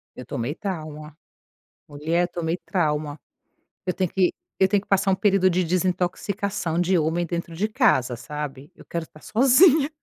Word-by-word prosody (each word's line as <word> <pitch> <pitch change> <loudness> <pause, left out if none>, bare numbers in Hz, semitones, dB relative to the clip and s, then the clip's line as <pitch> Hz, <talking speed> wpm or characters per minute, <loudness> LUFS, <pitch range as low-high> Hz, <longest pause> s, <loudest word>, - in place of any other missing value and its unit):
Eu 125 - -9
tomei 125 +5 -3
trauma, 155 -6 -6 0.7
mulher, 160 +4 0
tomei 170 -1 -2
trauma, 150 -4 -1 0.7
eu 180 - 0
tenho 185 -1 -1
que 185 -2 +2 0.2
eu 190 - +3
tenho 205 0 +2
que - - -23
passar 195 0 +2
um - - +3
período 195 -1 +3
de 180 0 +1
desintoxicação 185 +1 -1
de 180 +1 +2
homem 160 +2 0
dentro 170 0 -4
de 190 +6 -1
casa, 130 - +2
sabe? 145 +3 -7
Eu - - -16
quero 170 -1 -4
estar 155 -1 -16
sozinha. 275 - +5
175 Hz, 160 wpm, -24 LUFS, 155-190 Hz, 0.7 s, sozinha